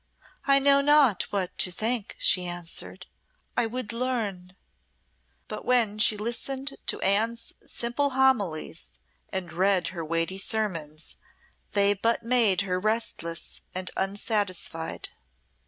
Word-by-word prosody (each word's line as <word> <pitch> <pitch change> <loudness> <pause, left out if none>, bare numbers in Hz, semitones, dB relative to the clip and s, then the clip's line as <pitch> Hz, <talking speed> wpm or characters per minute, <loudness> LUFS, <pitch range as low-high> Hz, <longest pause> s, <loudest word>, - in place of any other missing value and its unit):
"I 275 0 +5
know 280 0 +5
not 280 -8 +4
what 190 -3 -2
to 180 - +5
think," 220 +3 0
she 180 -1 +2
answered. 175 -1 -5 0.5
"I 235 - +2
would 230 -1 -3
learn." 215 -7 -3 0.9
But - - -6
when 225 -4 +2
she 215 0 +5
listened 265 +5 -3
to - - +1
Anne's 225 +4 +2
simple 240 +5 0
homilies, 205 - 0 0.3
and 180 -4 -4
read 185 0 +2
her 170 -2 -6
weighty 165 +4 0
sermons, 170 -8 -3 0.6
they 200 0 +4
but 230 +4 0
made 230 -6 +3
her 185 -2 -1
restless 210 -5 -3
and 185 0 -2
unsatisfied. 195 -4 -2
205 Hz, 120 wpm, -27 LUFS, 180-235 Hz, 0.9 s, I